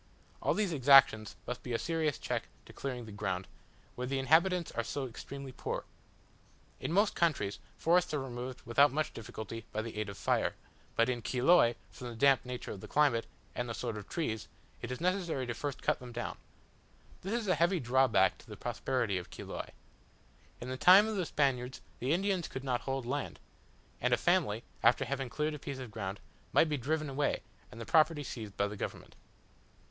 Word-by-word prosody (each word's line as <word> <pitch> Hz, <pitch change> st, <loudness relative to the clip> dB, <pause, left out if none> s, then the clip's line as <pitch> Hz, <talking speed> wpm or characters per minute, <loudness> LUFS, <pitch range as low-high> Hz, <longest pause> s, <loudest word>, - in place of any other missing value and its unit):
All -, -, +2 dB
these 205 Hz, -5 st, +1 dB
exactions 130 Hz, -6 st, +6 dB
must 125 Hz, 0 st, -4 dB
be 125 Hz, -, -5 dB
a -, -, +2 dB
serious 160 Hz, -1 st, 0 dB
check -, -, -3 dB, 0.2 s
to -, -, -13 dB
clearing 125 Hz, -3 st, -4 dB
the 110 Hz, -, -9 dB
ground, 95 Hz, -2 st, -3 dB, 0.5 s
where 125 Hz, 0 st, -4 dB
the 135 Hz, +1 st, -1 dB
inhabitants 165 Hz, +6 st, +3 dB
are 115 Hz, -, -1 dB
so 140 Hz, +4 st, -3 dB
extremely 135 Hz, +2 st, -7 dB
poor. 125 Hz, -, -4 dB, 1.0 s
In -, -, -3 dB
most 200 Hz, +4 st, +3 dB
countries, 145 Hz, -13 st, 0 dB, 0.2 s
forests 180 Hz, +2 st, +3 dB
are 150 Hz, -, 0 dB
removed 125 Hz, -1 st, -6 dB
without 140 Hz, +5 st, +5 dB
much 155 Hz, +2 st, -1 dB
difficulty 110 Hz, 0 st, -7 dB
by 110 Hz, -, -2 dB
the 115 Hz, -1 st, -7 dB
aid 105 Hz, -1 st, -2 dB
of 100 Hz, -, -8 dB
fire; -, -, +1 dB, 0.4 s
but 115 Hz, -, +4 dB
in 125 Hz, -2 st, -1 dB
Chiloe, 125 Hz, +1 st, +4 dB, 0.2 s
from 125 Hz, +6 st, -8 dB
the 120 Hz, -, -7 dB
damp 135 Hz, +3 st, +4 dB
nature 125 Hz, -1 st, -5 dB
of 95 Hz, -, -7 dB
the -, -, -8 dB
climate, 140 Hz, -6 st, +3 dB, 0.3 s
and 125 Hz, -1 st, -3 dB
the 115 Hz, -, -3 dB
sort 115 Hz, -3 st, -3 dB
of 105 Hz, -2 st, -8 dB
trees, 110 Hz, -11 st, -2 dB, 0.3 s
it 115 Hz, -, -5 dB
is 125 Hz, -, -4 dB
necessary 175 Hz, -7 st, 0 dB
first 140 Hz, +3 st, -4 dB
to -, -, -18 dB
cut -, -, +2 dB
them 125 Hz, -1 st, -9 dB
down. 120 Hz, 0 st, -4 dB, 0.9 s
This 210 Hz, +6 st, -1 dB
is 220 Hz, -, -5 dB
a 185 Hz, -, +4 dB
heavy 170 Hz, +3 st, +2 dB
drawback 130 Hz, +1 st, +3 dB
to -, -, -17 dB
the -, -, -9 dB
prosperity 120 Hz, -8 st, -1 dB
of 90 Hz, -, -10 dB
Chiloe. -, -, -6 dB, 0.9 s
In 125 Hz, -, -6 dB
the 130 Hz, -, -3 dB
time 190 Hz, +8 st, +8 dB
of 220 Hz, -, -2 dB
the 185 Hz, -4 st, -1 dB
Spaniards 130 Hz, -3 st, 0 dB, 0.2 s
the 130 Hz, +3 st, 0 dB
Indians 185 Hz, 0 st, +1 dB
could 130 Hz, -, -6 dB
not 125 Hz, -3 st, 0 dB
hold 135 Hz, -2 st, -3 dB
land; 140 Hz, +3 st, -3 dB, 0.6 s
and -, -, +4 dB
a -, -, -7 dB
family, 105 Hz, +2 st, +2 dB, 0.2 s
after 120 Hz, +3 st, +4 dB
having 135 Hz, 0 st, -3 dB
cleared 150 Hz, +4 st, -1 dB
a 150 Hz, -, -6 dB
piece 140 Hz, -1 st, -5 dB
of 130 Hz, -4 st, -7 dB
ground, 100 Hz, -2 st, -4 dB, 0.3 s
might 160 Hz, -, +5 dB
be 150 Hz, -, +1 dB
driven 155 Hz, +4 st, -1 dB
away, 140 Hz, +1 st, 0 dB, 0.3 s
and 115 Hz, -, -10 dB
the 115 Hz, -, -5 dB
property 155 Hz, +1 st, +4 dB
seized 110 Hz, -6 st, -7 dB
by 100 Hz, -, +2 dB
the 105 Hz, -, -6 dB
government. -, -, -6 dB
130 Hz, 200 wpm, -32 LUFS, 115-155 Hz, 1.0 s, time